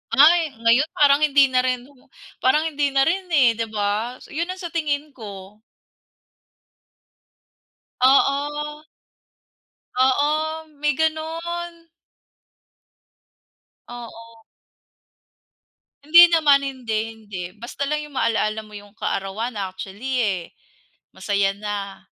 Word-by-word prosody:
Ay, 315 0 +5
ngayon 240 +6 +4
parang 280 -1 +5
hindi 285 -3 +4
na 255 - +3
rin 255 -1 -1
o 265 -1 -21 0.3
parang 300 +4 +3
hindi 290 -1 0
na 270 - +5
rin, 365 +5 0
eh, 285 -9 +4
di 230 - -1
ba, 215 +3 -2
so - - -16
yun 335 +3 -2
ang 370 - -4
sa 345 -3 -6
tingin 300 -2 -2
ko. 205 -4 -11 2.5
Oo. 295 +3 +1 1.1
Oo, 305 +5 +1
may 295 0 +2
gano'n. 330 +2 -3 2.0
Oo. 230 -1 -11 1.7
Hindi 340 +3 +9
naman, 300 -4 +4
hindi, 260 -5 -3 0.2
hindi, 210 -4 -10 0.2
basta 240 +5 -5
lang 300 - 0
'yong 295 - -15
maalaala 220 -3 0
mo 215 -1 -16
'yong 205 0 -15
kaarawan 215 +3 -3
actually, 200 +7 -4
eh, 195 -5 0 0.8
masaya 195 0 0
na. 200 -1 -5
265 Hz, 110 wpm, -22 LUFS, 220-300 Hz, 2.5 s, Hindi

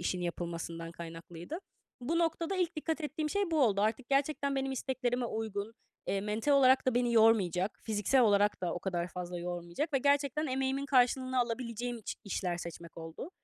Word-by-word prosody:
işin 180 +1 -1
yapılmasından 170 -1 -4
kaynaklıydı. 170 - -7 0.4
Bu 320 +8 0
noktada 335 +2 0
ilk 345 -3 0
dikkat 320 +1 -2
ettiğim 305 0 -2
şey 400 -3 0
bu 315 -3 +3
oldu. 200 -4 +3
Artık 220 +4 0
gerçekten 280 0 +1
benim 270 0 -1
isteklerime 250 -1 -1
uygun, 220 -1 -3 0.3
eee, 195 - 0
mental 215 +7 0
olarak 260 -1 +5
da 255 - +2
beni 245 -1 +2
yormayacak, 205 -4 +3
fiziksel 220 +4 +2
olarak 205 -2 +3
da 175 -2 -1
o - - -3
kadar 175 -2 -2
fazla 180 -1 -5
yormayacak 175 - -3
ve 275 - +3
gerçekten 285 +2 +2
emeğimin 265 +1 -1
karşılığını 255 0 +3
alabileceğim 240 0 -3
iç 215 - -5
işler 180 -3 -2
seçmek 170 -1 -8
oldu. 165 - -7
235 Hz, 170 wpm, -32 LUFS, 180-275 Hz, 0.4 s, olarak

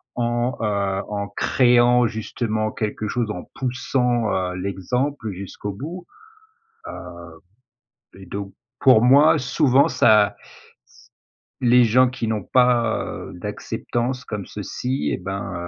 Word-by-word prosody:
en, 120 +1 -1
heu, 100 -2 -1
en 100 -1 -3
créant 120 -1 +4
justement 110 0 -3
quelque 105 0 -3
chose, 120 0 -2
en 90 - -6
poussant, 125 -2 0
heu, 90 -1 -2
l'exemple 110 +6 -2
jusqu'au 100 +2 -7
bout. 165 - -8 0.8
Heu 85 -1 -10 0.8
et 95 - -11
donc 100 0 -6 0.3
pour 130 -5 +6
moi, 145 +5 +6
souvent 135 +1 +3
ça 110 -5 +4
s - - -18 1.1
les 125 0 +5
gens 125 +3 +4
qui 120 -3 -4
n'ont 110 -3 -2
pas, 125 -2 +2
heu, - - -7
d' - - -9
acceptance 125 +1 -3
comme 105 -3 -5
ceci 130 +8 -3
et - - -1
ben, 95 +1 -5
115 Hz, 125 wpm, -22 LUFS, 100-125 Hz, 1.1 s, pour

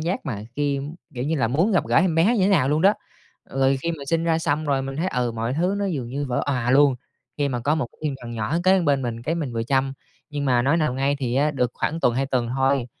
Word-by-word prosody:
giác 170 +1 -2
mà 105 -6 -4
khi, 140 -1 0 0.3
kiểu 125 +1 -3
như 160 +2 0
là, 115 -4 +1
muốn 165 - +2
gặp 185 - +2
gỡ - - +1
em 170 -1 +3
bé 200 +9 +3
như 195 - +2
thế 195 - +3
nào 150 -9 +3
luôn 150 +2 +1
đó. 200 +2 +6 0.6
Rồi 135 0 +2
khi 170 - -1
mình 140 -4 -7
sinh 165 +1 0
ra 165 -1 +2
xong 155 -1 -1
rồi 140 -2 0
mình 135 +1 -5
thấy, 175 +4 0
ừ, 125 -5 -1
mọi 115 +2 -2
thứ 180 +6 +1
nó 200 - -1
dường 135 -10 -3
như 140 +3 -3
vỡ 125 - 0
òa 125 -3 0
luôn, 140 0 +5 0.4
khi 145 -1 +1
mà 125 -2 -2
có 145 +6 +1
một 155 -7 -1
cái - - -27
thiên 145 -3 -1
thần 120 - -7
nhỏ 115 +8 -1
kế 190 0 +5
bên 140 -4 +1
mình, 115 -1 -4
cái 155 +7 -1
mình 150 -7 -3
vừa 115 0 -1
chăm. 135 +2 0 0.4
Nhưng 145 -1 -3
mà 125 -3 +3
nói 140 +5 +2
nào 155 -6 0
ngay, 135 +2 0
thì 125 -3 -2
á 145 +3 +2
được 125 -5 0
khoảng 165 +2 -2
tuần, 120 - +2
2 135 +1 0
tuần 125 -3 -1
thôi, 135 -2 +2
140 Hz, 285 wpm, -23 LUFS, 125-160 Hz, 0.6 s, đó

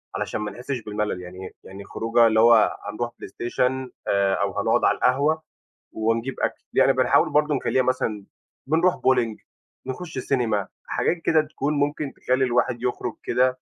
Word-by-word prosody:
علشان - - -3
ما 105 -1 -3
نحسّش 125 +4 -5
بالملل، 105 -3 -3
يعني 90 +1 -9
يعني 95 +1 -10
خروجة 115 +3 +2
اللي 110 -1 +2
هو 115 -1 +5
هنروح 120 +3 -4
بلايستيشن 125 +2 -2 0.2
آآ 100 -1 +2
أو - - -1
هنقُعد - - +2
على - - +4
القهوة 145 +5 +2 0.5
ونجيب 115 +4 -1
أكل. - - -2
يعني - - +5
بنحاول - - +3
برضه 150 0 +2
نخلّيها 130 0 +1
مثلًا 115 -5 -1 0.4
بنروح 165 +5 +3
bolling 120 -4 +1 0.5
نخُش 145 +4 -6
سينما، 115 -7 0 0.2
حاجات 175 - 0
كده 160 -1 +4
تكون 150 -1 -3
ممكن 145 0 -1
تخلّي 130 +1 0
الواحد 120 -1 0
يخرُج 125 -1 -2
كده 130 0 +1
125 Hz, 155 wpm, -24 LUFS, 110-135 Hz, 0.5 s, هو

